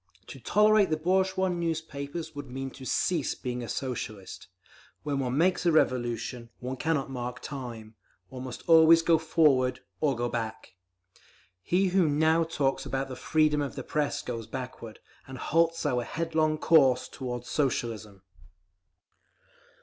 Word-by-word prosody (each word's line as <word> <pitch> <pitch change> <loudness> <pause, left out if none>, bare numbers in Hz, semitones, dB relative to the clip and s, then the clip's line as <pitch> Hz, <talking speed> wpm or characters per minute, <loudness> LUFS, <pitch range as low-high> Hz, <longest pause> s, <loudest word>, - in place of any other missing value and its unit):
To - - -9
tolerate 210 -1 +4
the 155 - +1
bourgeois 190 +3 +1
newspapers 160 -3 -4
would 145 -2 -8
mean 135 +1 -5
to 130 0 -11
cease 160 +1 0
being 125 -1 -4
a 120 - -6
Socialist. 110 -7 -5 0.6
When 145 -2 -1
one 130 0 -1
makes 180 +3 +2
a - - +5
Revolution, 120 -4 0
one 130 +1 -5
cannot 145 -2 -1
mark 125 -1 -5
time; 120 -6 -7 0.4
one 125 +3 -8
must 125 - -8
always 165 0 +7
go 165 -1 +4
forward—or 140 -3 +1
go 120 +1 -1
back. 115 -5 -5 0.9
He 185 - +1
who 180 -3 +3
now 160 +3 +3
talks 145 -4 -1
about 135 0 -3
the 130 - -6
'freedom 155 +2 +2
of 140 -1 -4
the 135 - -5
Press' 145 0 -1
goes 115 -3 -5
backward, 125 -2 -7 0.3
and 130 0 -8
halts 165 +4 +1
our 125 -1 +1
headlong 160 +2 0
course 140 -6 +4
toward 125 -2 -6
Socialism. 110 -8 -2
140 Hz, 140 wpm, -28 LUFS, 125-160 Hz, 0.9 s, always